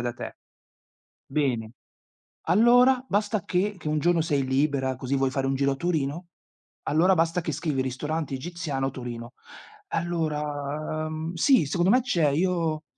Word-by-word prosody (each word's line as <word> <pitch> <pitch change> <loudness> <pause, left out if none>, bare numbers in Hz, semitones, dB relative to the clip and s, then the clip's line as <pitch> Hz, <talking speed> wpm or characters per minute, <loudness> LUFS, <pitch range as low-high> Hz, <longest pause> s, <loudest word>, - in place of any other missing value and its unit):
da 120 0 -2
te. - - -7 0.9
Bene. 125 -6 -1 0.8
Allora, 245 +6 +5
basta 205 -1 0
che 195 +3 0
che - - -11
un 150 0 +1
giorno 170 +1 +3
sei 145 -4 0
libera 130 -1 0
così 130 +2 -3
vuoi 135 -1 +1
fare 135 0 -1
un 135 - 0
giro 140 +1 +1
a 135 - -4
Torino, 165 0 -2 0.6
allora 180 +5 +3
basta 165 +2 +1
che 160 -2 -3
scrivi 150 -3 -1
ristorante 140 +3 -3
egiziano 145 -3 -3
Torino. 120 -1 -7 0.6
Allora, 155 -2 -2
mhmm, 160 +2 -4
sì 225 - +4
secondo 175 +5 +1
me 250 +4 +5
c'è, 170 -10 +1
io 165 0 0
155 Hz, 150 wpm, -26 LUFS, 135-175 Hz, 0.9 s, Allora